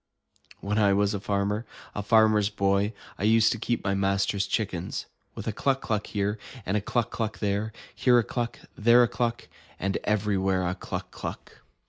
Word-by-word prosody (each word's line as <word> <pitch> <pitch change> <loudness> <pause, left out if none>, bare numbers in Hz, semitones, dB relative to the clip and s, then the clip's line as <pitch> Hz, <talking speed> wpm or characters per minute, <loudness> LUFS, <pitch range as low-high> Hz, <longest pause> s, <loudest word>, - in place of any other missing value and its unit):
When 105 +2 0
I 100 -2 +4
was 100 +1 +2
a 100 - -2
farmer, 100 +2 -1 0.3
a 105 - -3
Farmer's 110 -1 +4
Boy, 100 0 +1 0.3
I - - -3
used 110 +1 +5
to 115 - -2
keep 120 +1 -1
my 100 - +1
master's 100 0 +1
chickens. 95 -5 -2 0.3
With - - -6
a - - 0
cluck 135 +4 +1
cluck 105 -5 -2
here, 105 +1 -1 0.3
and 95 - 0
a 105 - +2
cluck 115 +3 -1
cluck 110 -2 -3
there. 105 +1 -1 0.2
Here 125 -2 +4
a 120 - +4
cluck, 120 +1 -3 0.2
and - - -12
there 120 +1 +8
a - - +3
cluck. 120 0 -2 0.3
And 95 0 0
everywhere 95 -3 +1
a 90 - 0
cluck - - -6
cluck! - - -7
105 Hz, 185 wpm, -27 LUFS, 100-110 Hz, 0.3 s, there